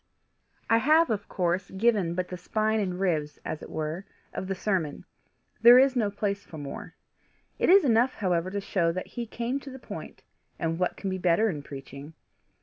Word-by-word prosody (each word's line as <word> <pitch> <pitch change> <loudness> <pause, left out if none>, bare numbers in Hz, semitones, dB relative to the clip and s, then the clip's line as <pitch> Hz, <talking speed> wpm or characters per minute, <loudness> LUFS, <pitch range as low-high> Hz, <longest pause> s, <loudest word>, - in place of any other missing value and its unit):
I 225 - +4
have 310 +3 +4
of 205 -2 -3
course 180 0 -1
given 190 -4 +1
but 180 0 -2
the 180 - -5
spine 215 +5 0
and 185 -3 -2
ribs, 155 -6 0
as 155 - -4
it - - -9
were, 155 +4 -3 0.3
of 190 - -4
the 195 - -2
sermon. 185 -7 -2 0.6
There 240 +2 +10
is 265 0 +5
no 220 -4 +2
place 200 0 -2
for 160 - -11
more. 140 -2 -7 0.6
It - - +2
is 385 -2 +7
enough 245 +1 +3
however 180 -3 0
to 200 +1 -3
show 170 -4 +1
that 185 - -4
he 240 -1 -4
came 240 +4 -2
to 280 - -10
the 265 - -8
point 255 - -9 0.3
and 165 0 -2
what 180 - 0
can 195 - -3
be 185 - -3
better 185 +5 +3
in 150 -4 -5
preaching? 140 +2 -10
190 Hz, 195 wpm, -27 LUFS, 170-225 Hz, 0.6 s, There